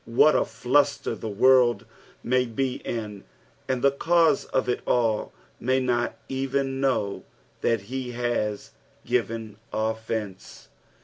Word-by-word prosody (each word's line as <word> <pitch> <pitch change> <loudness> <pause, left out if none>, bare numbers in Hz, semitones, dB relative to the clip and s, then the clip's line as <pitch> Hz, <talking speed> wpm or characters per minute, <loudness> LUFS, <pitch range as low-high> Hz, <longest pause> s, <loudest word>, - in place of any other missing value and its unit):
What 120 +6 +5
afiunter 140 -1 +1
the 110 - -4
world 120 +3 +4 0.4
may 125 +1 +2
be 125 +3 -2
in, 105 -4 -5 0.4
and 130 -2 -1
the 140 - +5
cause 165 +4 +3
of 130 - -1
it 125 - 0
all 115 -3 +1 0.3
may 130 +2 +1
not 120 -2 0
even 135 0 -1
know 125 -7 0 0.4
that 115 -3 +1
he 125 +4 -5
has 120 -4 -2 0.3
given 110 -2 -2
offence. 110 -2 -4
120 Hz, 120 wpm, -25 LUFS, 110-130 Hz, 0.4 s, What